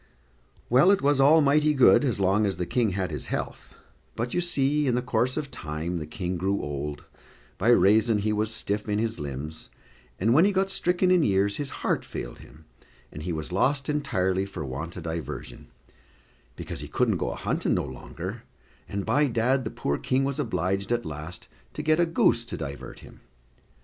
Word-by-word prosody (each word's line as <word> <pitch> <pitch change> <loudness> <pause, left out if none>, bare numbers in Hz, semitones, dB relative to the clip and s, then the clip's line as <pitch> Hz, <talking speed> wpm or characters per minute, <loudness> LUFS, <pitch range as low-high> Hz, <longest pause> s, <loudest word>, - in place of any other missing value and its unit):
Well, 130 +9 +5
it 200 -7 +3
was 145 -1 +3
all 155 +4 +6
mighty 150 +1 +3
good, 130 +2 +6
as 125 -7 0
long 100 +2 +3
as 95 -3 -2
the 90 - -2
King 115 0 0
had 95 -1 -2
his - - -5
health; - - -5 0.4
but, 120 +2 -3
you 175 - +1
see, 150 -4 +1
in 125 - +2
the 125 - +1
course 125 0 0
of 145 -3 -4
time 80 -4 -4
the 75 -2 -5
King 90 +2 -4
grew 95 +3 0
old, 75 0 -5 0.5
by 115 - +2
raison 110 -1 +5
he 105 +1 0
was 105 +1 0
stiff 105 -1 -2
in 105 - +1
his 110 -2 -1
limbs, 75 +2 -6 0.5
and 115 +5 +3
when 155 +6 +6
he 205 - +4
got 195 0 +1
stricken 180 0 +2
in 180 -2 +5
years, 100 -4 +2
his 145 -1 -3 0.2
heart - - +1
failed - - -7
him, 80 +1 -16 0.5
and 75 - -8
he 90 +3 -3
was 80 +1 -4
lost 135 +9 +1
entirely 95 -10 0
for 85 -6 -6
want 75 +7 -6
o' - - -5
diversion, 80 -1 -6 0.9
because - - -7
he - - -6
couldn't - - +1
go - - -2
a - - -4
hunting - - -1
no - - -1
longer; 65 -2 -7 0.5
and, 100 -1 -3
by 145 +1 +3
dad 125 +2 +1
the - - -2
poor 70 -7 -2
King 130 +1 +1
was 140 +1 -2
obliged 95 - -1
at 120 0 0
last 80 +3 -7 0.3
to - - -5
get 155 +1 +3
a 170 - +3
goose 140 -7 +3
to 115 - -6
divert 70 +1 -7
him. - - -15
110 Hz, 200 wpm, -26 LUFS, 90-140 Hz, 0.9 s, all